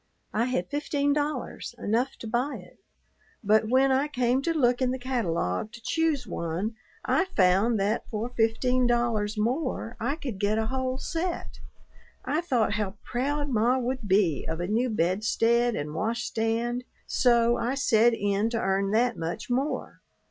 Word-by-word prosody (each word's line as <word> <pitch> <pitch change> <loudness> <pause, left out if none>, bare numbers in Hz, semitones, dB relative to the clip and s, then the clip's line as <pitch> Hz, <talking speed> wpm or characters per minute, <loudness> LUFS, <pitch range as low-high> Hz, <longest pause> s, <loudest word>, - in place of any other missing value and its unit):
I 220 +3 +1
had 210 -8 -1
fifteen 285 -1 0
dollars, 290 -4 -3
enough 235 +4 0
to 225 - -6
buy 245 +6 -1
it, - - -13 0.6
but 215 +1 +3
when 265 +2 +4
I 270 +3 +2
came 255 -2 +1
to 335 - 0
look 250 -6 +2
in 255 - +2
the 260 - -1
catalogue 215 - -1
to 235 - -10
choose 315 +2 0
one 170 +7 -3 0.3
I 385 - +2
found 205 - +3
that 210 +3 -1
for 220 +2 -3
fifteen 245 +3 +2
dollars 230 -3 0
more 245 +1 -1
I 245 +6 -1
could 260 - -6
get 205 +2 +1
a 220 - +1
whole 260 +2 -2
set. 335 +5 -4 0.7
I 315 - 0
thought 250 -11 +1
how 205 -2 -2
proud 285 +4 -1
ma 240 +1 +2
would 255 -2 -3
be 190 -6 +2
of 160 +1 -3
a 175 - -1
new 230 +6 +1
bedstead 220 +5 +2
and 150 +1 -4
wash 230 +8 -1
stand, 235 +2 -1 0.2
so 235 -1 +3
I 245 +3 -1
set 235 -3 +4
in 205 +1 0
to 230 - -2
earn 195 0 +1
that 240 +1 +2
much 165 +8 -4
more. 270 +5 -2
235 Hz, 165 wpm, -27 LUFS, 215-260 Hz, 0.7 s, when